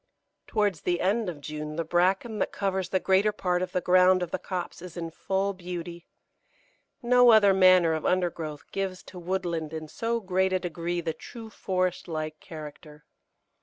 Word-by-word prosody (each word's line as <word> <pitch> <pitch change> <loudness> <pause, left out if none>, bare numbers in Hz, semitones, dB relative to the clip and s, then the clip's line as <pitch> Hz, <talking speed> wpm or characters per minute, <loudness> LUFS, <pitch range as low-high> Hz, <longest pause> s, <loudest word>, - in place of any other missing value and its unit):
Towards 205 -7 0
the 175 -1 0
end 205 +2 +1
of 155 -5 -8
June 150 +1 -6
the 165 - -1
bracken 190 +6 +1
that - - 0
covers 190 -2 -2
the 190 - +1
greater 190 +3 +3
part 180 -3 -1
of 185 - -3
the 180 - 0
ground 185 +1 +5
of 175 - -5
the - - -2
copse 180 -2 -5
is 180 -1 -10
in 165 -1 -4
full 195 +4 -1
beauty. 175 -2 -7 1.0
No 245 0 +6
other 210 -3 +7
manner 185 -3 +5
of 160 - -2
undergrowth 170 -5 -1
gives 190 -2 -3
to 185 - -11
woodland 170 -3 -3
in 155 -1 -5
so 230 +8 -2
great 190 -2 0
a 185 - +2
degree 175 0 -3
the 165 -1 -2
true 225 +4 -10
forest 185 -3 -2
like 155 -2 -4
character. 150 -1 -11
180 Hz, 175 wpm, -27 LUFS, 165-190 Hz, 1.0 s, other